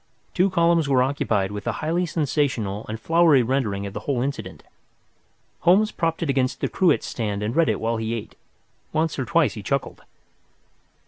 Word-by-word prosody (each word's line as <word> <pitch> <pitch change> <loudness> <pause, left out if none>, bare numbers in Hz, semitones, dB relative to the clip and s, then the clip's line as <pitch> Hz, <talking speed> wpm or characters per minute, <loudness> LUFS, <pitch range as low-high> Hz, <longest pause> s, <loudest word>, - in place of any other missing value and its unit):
Two 185 +2 +3
columns 170 -4 +2
were 130 -2 +4
occupied 110 -7 0
with 105 -1 -6
a - - 0
highly 170 +3 -1
sensational 130 - -1
and 110 0 -4
flowery 165 -3 +4
rendering 110 -6 -1
of 100 - -6
the - - -4
whole 140 -4 -2
incident. 110 -9 -5 1.0
Holmes 205 +5 +4
propped 165 0 -1
it 160 - -3
against 130 -2 0
the - - 0
cruet 180 -6 +2
stand 105 -3 -3
and 110 +3 -2
read 165 -1 +3
it - - 0
while 115 +1 -1
he 110 +1 -2
ate. 110 -1 -7 0.6
Once 160 -1 0
or 130 - -1
twice 165 +3 +2
he 105 - -7
chuckled. 140 +6 -3
135 Hz, 180 wpm, -23 LUFS, 110-165 Hz, 1.0 s, were